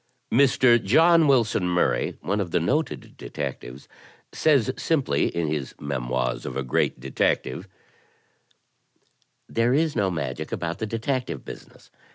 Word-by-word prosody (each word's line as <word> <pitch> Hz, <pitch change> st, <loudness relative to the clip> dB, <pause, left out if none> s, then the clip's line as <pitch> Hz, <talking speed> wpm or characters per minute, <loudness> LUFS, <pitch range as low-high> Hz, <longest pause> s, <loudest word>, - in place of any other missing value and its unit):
Mr. 125 Hz, -2 st, +4 dB
John 165 Hz, -, +5 dB
Wilson 115 Hz, -8 st, +2 dB
Murray, 85 Hz, -9 st, 0 dB
one 100 Hz, +2 st, -1 dB
of 90 Hz, -, -3 dB
the 85 Hz, -, +1 dB
noted 150 Hz, -, -2 dB
detectives, -, -, -6 dB, 0.4 s
says 135 Hz, -6 st, +2 dB
simply 155 Hz, -5 st, 0 dB
in 85 Hz, -1 st, -2 dB
his 75 Hz, -4 st, -3 dB
"Memoirs 65 Hz, -3 st, -2 dB
of -, -, -5 dB
a 70 Hz, -, -1 dB
Great 65 Hz, 0 st, 0 dB
Detective": 70 Hz, +7 st, -1 dB, 1.8 s
"There 115 Hz, +3 st, +1 dB
is 160 Hz, 0 st, +1 dB
no 100 Hz, -4 st, +1 dB
magic 70 Hz, -8 st, -4 dB
about 85 Hz, 0 st, -3 dB
the 110 Hz, -, -2 dB
detective 125 Hz, +4 st, -3 dB
business. -, -, -12 dB
100 Hz, 130 wpm, -24 LUFS, -, 1.8 s, John